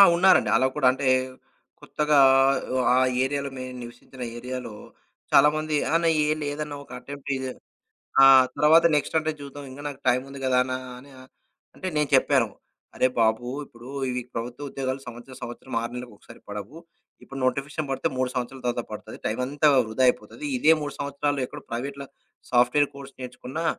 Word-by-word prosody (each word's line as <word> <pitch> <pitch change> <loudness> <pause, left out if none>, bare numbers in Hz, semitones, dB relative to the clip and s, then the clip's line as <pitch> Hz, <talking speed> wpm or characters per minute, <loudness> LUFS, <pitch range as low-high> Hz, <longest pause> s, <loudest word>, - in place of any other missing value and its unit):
ఉన్నారండి. 190 +2 +5
అలా 130 +2 +3
కూడా 140 -4 +3
అంటే, 135 +1 -2 0.7
కొత్తగా 150 -1 +1 0.8
ఆ - - +4 0.3
ఏరియాలో 140 +1 -2
మేము 130 0 -6
నివసించిన 120 +2 -10
ఏరియాలో 125 -1 -6 0.6
చాలామంది 155 +1 +4 0.2
"అన్న 165 0 +2 0.2
ఏం 155 +1 +1
లేదన్న 145 +1 -4
ఒక - - -18
అటెంప్ట్ 140 +2 -9
ఇది. 130 0 -4 0.7
ఆ! - - +10 0.3
తర్వాత 160 +3 +6
నెక్స్ట్ 150 +2 -1
అంటే 155 0 -1
జూద్దాం 140 0 -9
ఇంగ 135 +2 -10
నాకు 140 -2 -7
టైముంది 130 +2 0
గదా!" 130 -1 +2
అన్న 130 0 -4 0.3
అని 140 +2 -16
అ - - -12 0.5
అంటే, 185 - -6
నేను 150 -2 +1
చెప్పాను. 130 -2 +3 0.5
"అరే 130 - +3
బాబు! 110 +1 +2 0.2
ఇప్పుడు 120 -2 -15 0.2
ఇవి 125 0 -2
ప్రభుత్వ 120 +5 -5
ఉద్యోగాలు 130 0 -3
సంవత్సరం, 120 +2 -10
సంవత్సరం 120 +2 -7
6 115 - -4
నెల్ల‌కు 125 -2 -7
ఒకసారి - - -16
పడవు. 105 +8 -7 0.5
ఇప్పుడు 135 0 -8
నోటిఫికేషన్ 140 +4 -2
పడితే 135 - 0
3 130 0 0
సంవత్సరాల 125 +1 -4
తర్వాత 120 -1 -1
పడుతది. 110 +1 -8
టైమంతా 130 +7 +1 0.2
వృధా 110 +4 -1
అయిపోతది. 275 - -1
ఇదే 160 -10 +6
3 145 -1 -4
సంవత్సరాలు 145 0 -1
ఎక్కడో - - -10
ప్రైవేట్‌లా 140 +4 -5 0.4
సాఫ్ట్‌వేర్ 125 +4 +4
కోర్స్ 140 -1 -11
నేర్చుకున్నా, 125 +4 -6
135 Hz, 155 wpm, -25 LUFS, 125-145 Hz, 0.8 s, ఆ